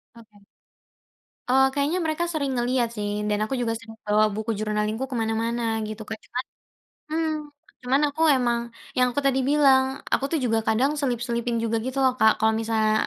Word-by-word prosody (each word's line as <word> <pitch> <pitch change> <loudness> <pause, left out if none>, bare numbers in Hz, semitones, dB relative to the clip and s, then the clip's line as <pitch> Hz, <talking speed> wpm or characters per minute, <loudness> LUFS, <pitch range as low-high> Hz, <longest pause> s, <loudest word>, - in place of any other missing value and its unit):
Oke. 210 -3 -18 1.0
Oh 265 +1 +5
kayaknya 290 +5 0
mereka 315 +2 0
sering 280 -3 -1
ngelihat 245 0 +1
sih, 205 0 -2 0.2
dan 210 - +1
aku 215 - -3
juga 230 -1 0
sering 225 0 -12
bawa 210 +1 +4
buku 220 +1 -2
journaling-ku 215 +3 -1
kemana-mana 230 0 -1 0.3
gitu 215 +1 -7
Kak. 220 - -4
Cuman 250 +1 -4 0.6
mmm, 320 +1 0 0.5
cuman 260 +3 +2
aku 290 +3 -8 0.2
emang 240 -2 +1 0.4
yang 250 0 +4
aku 285 - -1
tadi 270 -1 +2
bilang, 275 -3 +5 0.3
aku - - +2
tuh 325 - +2
juga 225 -2 +2
kadang 245 +6 +3
selip-selipin 240 -2 -1
juga 230 0 0
gitu 260 +1 -3
loh 260 - +4
Kak, 220 - +6
kalau 220 0 +3
misalnya 220 -1 +1
240 Hz, 170 wpm, -25 LUFS, 220-265 Hz, 1.0 s, Kak